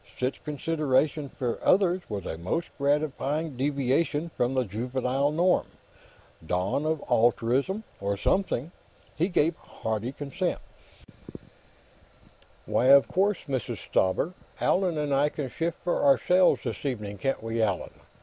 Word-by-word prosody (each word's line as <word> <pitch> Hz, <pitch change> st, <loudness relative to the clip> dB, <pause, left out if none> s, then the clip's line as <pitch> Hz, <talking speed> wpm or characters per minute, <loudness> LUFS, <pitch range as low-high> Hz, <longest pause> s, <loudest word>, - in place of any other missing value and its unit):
Such 130 Hz, +1 st, -2 dB
consideration 150 Hz, -1 st, 0 dB
for 125 Hz, -3 st, -3 dB
others 185 Hz, -1 st, +3 dB
was 100 Hz, -4 st, -4 dB
a -, -, -3 dB
most 90 Hz, -, -2 dB
gratifying 145 Hz, +1 st, 0 dB
deviation 140 Hz, +4 st, 0 dB
from 125 Hz, +2 st, 0 dB
the 130 Hz, -, +2 dB
juvenile 125 Hz, +6 st, -1 dB
norm; 175 Hz, +4 st, +2 dB, 0.8 s
dawn 90 Hz, -, -1 dB
of 160 Hz, -2 st, -1 dB
altruism, 125 Hz, -, +2 dB, 0.2 s
or 100 Hz, 0 st, -1 dB
something. 170 Hz, -, 0 dB, 0.4 s
He 170 Hz, +3 st, +1 dB
gave 170 Hz, -3 st, +2 dB
hearty 110 Hz, +2 st, -4 dB
assent: 175 Hz, +6 st, -2 dB, 2.1 s
"Why, 125 Hz, -, +1 dB
of 140 Hz, +1 st, +7 dB
course, 195 Hz, +1 st, +1 dB
Mrs. 130 Hz, -5 st, -2 dB
Stauber. 95 Hz, -, 0 dB, 0.3 s
Allan 180 Hz, -3 st, +1 dB
and 150 Hz, -2 st, 0 dB
I 140 Hz, +2 st, +3 dB
can 140 Hz, -4 st, -5 dB
shift 165 Hz, 0 st, -2 dB
for 175 Hz, -, 0 dB
ourselves, 180 Hz, +6 st, +4 dB
this -, -, -4 dB
evening; 105 Hz, -7 st, -4 dB
can't 135 Hz, -1 st, -1 dB
we, 115 Hz, 0 st, -1 dB
Allan? 100 Hz, -4 st, 0 dB
140 Hz, 130 wpm, -27 LUFS, 120-160 Hz, 2.1 s, of